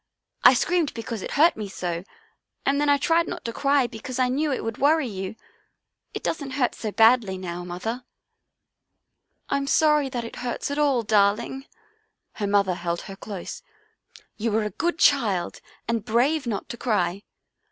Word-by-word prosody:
I -, -, +8 dB
screamed 335 Hz, +4 st, +1 dB
because 230 Hz, -2 st, -5 dB
it -, -, -5 dB
hurt 320 Hz, +4 st, +5 dB
me 210 Hz, -2 st, -5 dB
so, 175 Hz, -2 st, -4 dB, 0.6 s
and 280 Hz, +1 st, +2 dB
then 295 Hz, -, +2 dB
I 285 Hz, -, +5 dB
tried 330 Hz, +4 st, +2 dB
not 350 Hz, -, -6 dB
to 230 Hz, -, -3 dB
cry 275 Hz, +1 st, +2 dB
because 240 Hz, +2 st, -6 dB
I 255 Hz, -1 st, +2 dB
knew 290 Hz, +4 st, 0 dB
it 265 Hz, -, -2 dB
would 225 Hz, -1 st, -4 dB
worry 300 Hz, +2 st, +3 dB
you. 195 Hz, -1 st, -5 dB, 0.8 s
It -, -, -5 dB
doesn't 285 Hz, -5 st, -3 dB
hurt 250 Hz, -3 st, +2 dB
so 215 Hz, -, -5 dB
badly 225 Hz, -3 st, +4 dB
now, 175 Hz, -1 st, -5 dB
Mother." 200 Hz, +8 st, -4 dB, 0.7 s
" -, -, -50 dB
I'm 280 Hz, 0 st, 0 dB
sorry 300 Hz, -1 st, +3 dB
it 240 Hz, -3 st, -5 dB
hurts 245 Hz, +3 st, -3 dB
at 285 Hz, -, -2 dB
all, 275 Hz, -5 st, +2 dB
darling," 215 Hz, +5 st, +1 dB, 0.7 s
her 205 Hz, -, -1 dB
mother 200 Hz, -2 st, +2 dB
held 170 Hz, -1 st, -3 dB
her 195 Hz, -, -9 dB
close. 195 Hz, -2 st, -7 dB, 0.4 s
" -, -, -23 dB
You 225 Hz, +1 st, -1 dB
were 220 Hz, +1 st, +1 dB
a 210 Hz, -, -3 dB
good 345 Hz, +1 st, -1 dB
child 215 Hz, -, +2 dB, 0.3 s
and 230 Hz, -2 st, -1 dB
brave 245 Hz, +6 st, +1 dB
not 210 Hz, -4 st, -3 dB
to 240 Hz, -, -6 dB
cry. 200 Hz, -6 st, 0 dB
235 Hz, 175 wpm, -25 LUFS, 205-280 Hz, 0.8 s, I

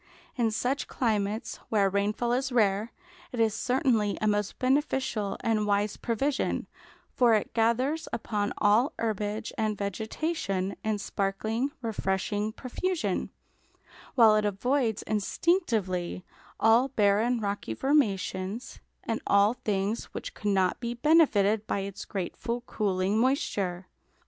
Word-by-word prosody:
In 235 Hz, -3 st, +2 dB
such 250 Hz, +6 st, -1 dB
climates, 215 Hz, -2 st, -1 dB
where 205 Hz, -3 st, +3 dB
a -, -, +3 dB
rainfall 210 Hz, +5 st, 0 dB
is 265 Hz, +2 st, 0 dB
rare, 215 Hz, -1 st, +2 dB, 0.4 s
it 245 Hz, -, -5 dB
is 225 Hz, -2 st, +3 dB
certainly 245 Hz, -5 st, +1 dB
a -, -, -1 dB
most 205 Hz, -1 st, 0 dB
beneficial 255 Hz, -6 st, 0 dB
and 215 Hz, -2 st, +1 dB
wise 205 Hz, 0 st, +1 dB
provision, 265 Hz, +4 st, -1 dB, 0.5 s
for 240 Hz, -3 st, +5 dB
it 210 Hz, -, -2 dB
gathers 250 Hz, +7 st, +1 dB
upon 210 Hz, -2 st, -2 dB
all 220 Hz, +7 st, +3 dB
herbage 215 Hz, 0 st, -2 dB
and 215 Hz, -1 st, 0 dB
vegetation, 200 Hz, -, -2 dB
in 215 Hz, -1 st, 0 dB
sparkling, 215 Hz, +6 st, -1 dB
refreshing 205 Hz, -1 st, -1 dB
profusion; 255 Hz, -, -2 dB, 0.9 s
while 225 Hz, -4 st, +7 dB
it 215 Hz, -, +2 dB
avoids 225 Hz, +3 st, 0 dB
instinctively 210 Hz, -, 0 dB, 0.3 s
all 230 Hz, +4 st, +5 dB
barren 225 Hz, 0 st, +2 dB
rocky 200 Hz, -, -3 dB
formations 210 Hz, -, 0 dB, 0.2 s
and 225 Hz, -, -2 dB
all 200 Hz, +2 st, +5 dB
things 210 Hz, -1 st, -2 dB
which -, -, -5 dB
could 210 Hz, -, -3 dB
not 190 Hz, -2 st, +2 dB
be 235 Hz, 0 st, -3 dB
benefited 225 Hz, -8 st, +3 dB
by 200 Hz, -, -1 dB
its 195 Hz, 0 st, -6 dB
grateful 225 Hz, +5 st, -4 dB
cooling, 200 Hz, -3 st, 0 dB
moisture. 200 Hz, -, 0 dB
215 Hz, 125 wpm, -28 LUFS, 200-245 Hz, 0.9 s, while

